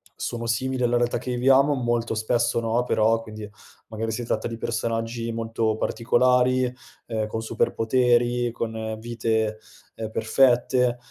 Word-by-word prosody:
sono 115 -1 -4
simili 130 +2 -1
alla 120 0 +2
realtà 120 0 +1
che 125 +1 -5
viviamo, 135 +3 +4
molto 120 -2 -1
spesso 115 +2 +1
no, 115 +1 0
però, 115 -1 +2
quindi 110 -1 -9 0.4
magari 110 0 -4
si 120 +3 -3
tratta 110 -1 -2
di 115 - -6
personaggi 115 0 -2
molto 115 -1 -1
particolari, 125 +2 +2 0.3
ehm, 110 -2 -2
con 110 +1 -4
superpoteri, 120 +2 +1
con 110 -1 -4
vite, 110 -1 -1 0.4
ehm, 110 -1 -5
perfette. 125 +1 +2
115 Hz, 135 wpm, -24 LUFS, 110-125 Hz, 0.4 s, viviamo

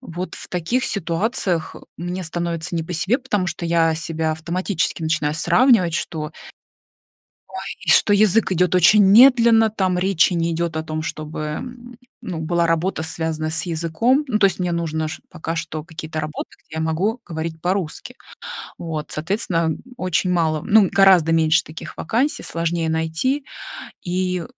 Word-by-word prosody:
Вот 180 -6 -6
в - - -9
таких 210 +10 -1
ситуациях 180 -1 -1 0.2
мне 175 +2 -4
становится 170 +1 -3
не 165 - -1
по 175 - -6
себе, 195 - +1
потому 210 -8 -1
что 170 - -4
я 165 -1 +3
себя 160 -1 -2
автоматически 170 +1 -2
начинаю 155 -1 0
сравнивать, 185 - +3
что 155 -3 -3 1.2
ой, - - -3
что 205 - +5
язык 210 0 +3
идет 180 0 +2
очень 185 +4 +6
медленно, 230 +1 +6
там 190 -4 0
речи 185 -1 +3
не 170 0 0
идет 165 0 -2
о 160 - -2
том, 155 0 -4
чтобы, 155 -1 -6
м, 240 +10 -7 0.2
была, 170 -1 -1
ну, - - +2
работа, 165 +1 0
связанная 160 +1 -3
с 160 0 +1
языком. 170 - +1
Ну, 215 -4 0
то 200 - +5
есть 190 - -3
мне 180 -1 -1
нужно 160 -2 -2 0.2
пока 165 -2 -5
что 160 -2 -4
какие-то 160 -1 -6
работы, 155 0 -5 0.2
где 160 - -11
я - - -1
могу 185 +9 -1
говорить 160 0 -5
по-русски. 180 -3 -3 0.6
Вот, 155 -3 -5
соответственно, 165 -1 -1 0.2
очень 185 0 0
мало 160 -3 +1
ну, 205 -2 +5
гораздо 185 -5 +5
меньше 160 0 +3
таких 155 - -10
вакансий, 245 - -1
сложнее 165 -1 -2
найти. 160 - -1 0.6
И 180 0 -1
170 Hz, 155 wpm, -21 LUFS, 160-195 Hz, 1.2 s, очень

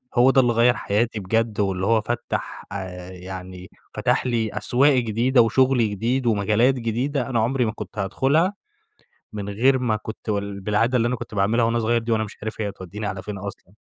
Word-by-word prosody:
هو 125 +2 +6
ده 130 - +5
اللي 120 -1 +2
غيّر 120 +2 +4
حياتي 110 +2 -1
بجد، 110 +2 -1
واللي 95 -1 0
هو 115 0 +3
فتَّح 120 +3 -4
آآ، 95 -2 -6
يعني 90 0 -9 0.2
فتَح - - +1
لي 115 -3 0
أسواق 125 +7 +3
جديدة 120 +1 +3
وشغل 125 0 +3
جديد، 120 +6 -1
ومجالات 110 +4 +3
جديدة، 125 +5 -2
أنا 120 -3 +1
عمري 125 +2 +1
ما 110 - -1
كنت 110 - -9
هادخلها، 140 - +1 0.8
من 105 -1 -5
غير 130 +6 +3
ما 115 -4 +1
كنت 110 +1 -7
وال 100 -1 -2
بالعادة 115 +5 +1
اللي 115 - +2
أنا 125 - 0
كنت 110 - -8
باعملها 110 +4 +2
وأنا 115 0 +1
صغير 115 +1 +1
دي 115 0 -3
وأنا 110 -1 +2
مش 105 - -9
عارف 110 0 -4
هي 105 - -1
هتوديني 100 +2 -7
على 95 -2 -5
فين 105 -1 -6
أصلًا. 100 -1 -9
110 Hz, 195 wpm, -23 LUFS, 100-120 Hz, 0.8 s, هو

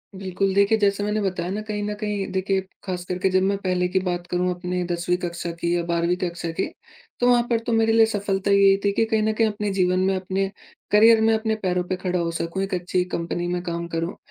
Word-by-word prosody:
बिल्कुल। 190 0 -1
देखिए, 200 +2 +4
जैसे 205 -1 +1
मैंने 210 +1 0
बताया 180 -3 -2
ना 210 +2 -3
कहीं 210 -1 -4
न 210 0 -2
कहीं 205 -2 -2
देखिए, 190 0 0 0.2
ख़ास 180 -2 -4
करके 180 +1 0
जब 185 0 +2
मैं 200 +1 +1
पहले 180 -1 +1
की 190 +1 +1
बात 175 -1 -3
करूँ 180 +1 0
अपने 180 0 -3
10वीं 175 +1 0
कक्षा 170 0 -3
की 170 0 +1
या 175 - 0
12वीं 170 +1 +1
कक्षा 170 -2 -3
की - - +2 0.5
तो 245 - +3
वहाँ 245 -1 +5
पर 230 - +2
तो 235 - +1
मेरे 225 0 +3
लिए 225 0 +6
सफ़लता 200 -2 -1
ये 200 -1 +6
थी 200 - +4
कि 225 +3 +1
कहीं 220 -1 +1
न 220 - +1
कहीं 225 +1 +2
अपने 210 -1 -2
जीवन 185 -1 +2
में 190 +1 +2
अपने 190 +1 -1 0.4
करियर 220 +2 +6
में 225 0 +4
अपने 220 0 0
पैरों 180 -1 +1
पे 185 +1 -2
खड़ा 180 -1 -2
हो 170 -1 -1
सकूँ 170 +3 -3
एक 195 - -4
अच्छी 180 0 0
कंपनी 175 +1 -3
में 175 0 -1
काम 170 -1 -3
करूँ। 165 +2 -3
190 Hz, 240 wpm, -23 LUFS, 180-205 Hz, 0.5 s, लिए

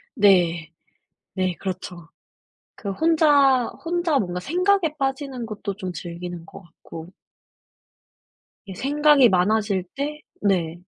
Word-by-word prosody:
네. 175 -6 +3 0.6
네 185 -2 -1
그렇죠. 180 -3 -6 0.7
그 200 - -6
혼자 285 -1 +3 0.2
혼자 340 -3 +1
뭔가 180 -6 -3
생각에 355 - +1
빠지는 270 -2 -3
것도 210 -2 -5
좀 185 -2 -6
즐기는 175 0 -7
것 - - -12
같고 165 -1 -12 1.6
이 195 - -8
생각이 285 +1 +4
많아질 200 +1 +1
때 295 +2 -4 0.2
네. 175 -4 0
205 Hz, 195 characters per minute, -23 LUFS, 180-285 Hz, 1.6 s, 생각이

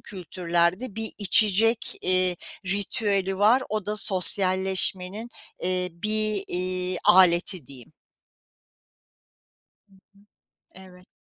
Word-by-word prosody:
kültürlerde 180 +3 -3
bir 225 0 -4
içecek, 215 +2 +1
eee, 185 -1 0 0.3
ritüeli 195 0 -2
var, 225 +6 +3
o 215 -2 -5
da 210 +1 -4
sosyalleşmenin, 190 +1 +3 0.3
eee, 180 0 -2
bir, 215 +2 -2
iii, 185 0 -4
aleti 180 -3 +3
diyeyim. 125 -3 -16 1.9
Hı 200 - -32
hı. - - -23 0.9
Evet. 180 -1 -19
190 Hz, 90 wpm, -23 LUFS, 180-210 Hz, 1.9 s, var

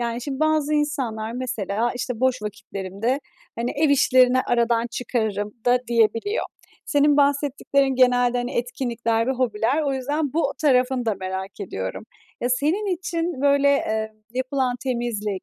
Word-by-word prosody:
yani, 235 0 -2
şimdi 275 0 -4
bazı 310 -1 +2
insanlar 250 -7 -1
mesela, 235 -3 -2
işte, 245 -1 -4
"Boş 260 -2 +1
vakitlerimde, 210 +4 -3 0.4
hani, 235 +1 -1
ev 305 +2 +1
işlerini 255 -2 +5
aradan 235 -1 +2
çıkarırım" 220 -4 -2
da 245 +1 +5
diyebiliyor. 230 - +1 0.4
Senin 290 -1 +3
bahsettiklerin 280 -1 +2
genelde, 245 -1 +3
hani, 245 +1 -3
etkinlikler 235 -2 -1
ve - - +1
hobiler 250 +3 0
o 280 -2 0
yüzden 285 +2 -2
bu 310 -3 +1
tarafını 255 -3 +2
da 220 - +2
merak 190 +1 -6
ediyorum. 95 - -5 0.4
Ya, 245 - 0
senin 350 +10 +1
için 335 -4 -3
böyle, 280 0 +4
eee, 220 -5 -1 0.2
yapılan 260 -1 -1
temizlik, 230 -6 -2
250 Hz, 140 wpm, -23 LUFS, 225-280 Hz, 0.4 s, işlerini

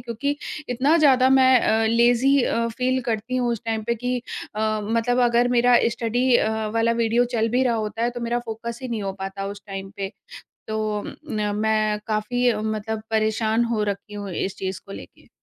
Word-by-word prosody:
क्योंकि 275 +5 -3 0.3
इतना 270 +7 +3
ज़्यादा 260 -4 +5
मैं 260 -2 +6
अ, 220 0 +2
लेज़ी 240 +4 +4
अ, 230 0 0
फ़ील 255 +3 0
करती 235 +2 -2
हूँ 245 -1 +1
उस 230 - -5
टाइम 225 -1 -2
पे 235 - +1
कि 245 +2 -2 0.4
अ, - - -5 0.2
मतलब, 230 +3 0
अगर 240 +1 +3
मेरा 245 0 +4 0.2
स्टडी 245 +2 +1
अ, 215 - +1 0.2
वाला 230 0 +2
वीडियो 230 +2 +3
चल 225 0 +2
भी 250 +3 +1
रहा 240 -2 +2
होता 220 +1 -3
है, 240 - +2
तो 240 0 -7
मेरा 235 +1 -1
फ़ोकस 230 +1 -5
ही 255 - -4
नहीं 225 -3 -3
हो 195 -1 -3
पाता 195 +1 -4
उस 200 0 -7
टाइम 195 0 -6
पे। 195 -1 -4 0.6
तो 215 -1 -2 0.3
न 210 -1 -1
मैं 215 0 +1
काफ़ी 240 +3 +1
मतलब, 215 0 -3
परेशान 220 +1 +1
हो 210 -1 0
रखी 205 0 -4
हूँ 205 -2 -6
इस 190 +2 -3
चीज़ 190 0 -4
को 195 - -11
लेके। - - -12
225 Hz, 195 wpm, -23 LUFS, 215-245 Hz, 0.6 s, मैं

